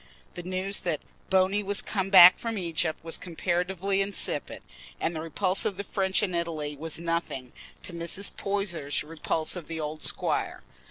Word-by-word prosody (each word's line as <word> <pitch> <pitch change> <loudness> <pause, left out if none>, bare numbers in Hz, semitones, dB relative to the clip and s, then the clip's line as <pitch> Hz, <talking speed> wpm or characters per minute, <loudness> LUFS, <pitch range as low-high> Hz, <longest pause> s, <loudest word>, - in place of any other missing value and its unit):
The - - -6
news 185 +3 -2
that 170 -5 -1 0.3
"Bony" 190 +2 +3
was 205 0 +1
come 195 -2 -2
back 185 -2 +10
from 230 -2 -3
Egypt 165 -3 -1
was 165 0 -4
comparatively 180 +3 -1
insipid, 195 0 -2 0.4
and 170 - -1
the 155 - -3
repulse 185 +4 +1
of 195 - -1
the 200 - -3
French 190 0 0
in 185 -3 -1
Italy 160 -4 -2
was 160 +1 -4
nothing 165 -7 -3 0.3
to 180 - -6
Mrs. 170 +4 -3
Poyser's 190 -8 -1
repulse 160 +1 -1
of 175 -3 -7
the 165 -1 -4
old 155 0 -4
squire. - - 0
175 Hz, 165 wpm, -28 LUFS, 165-195 Hz, 0.4 s, back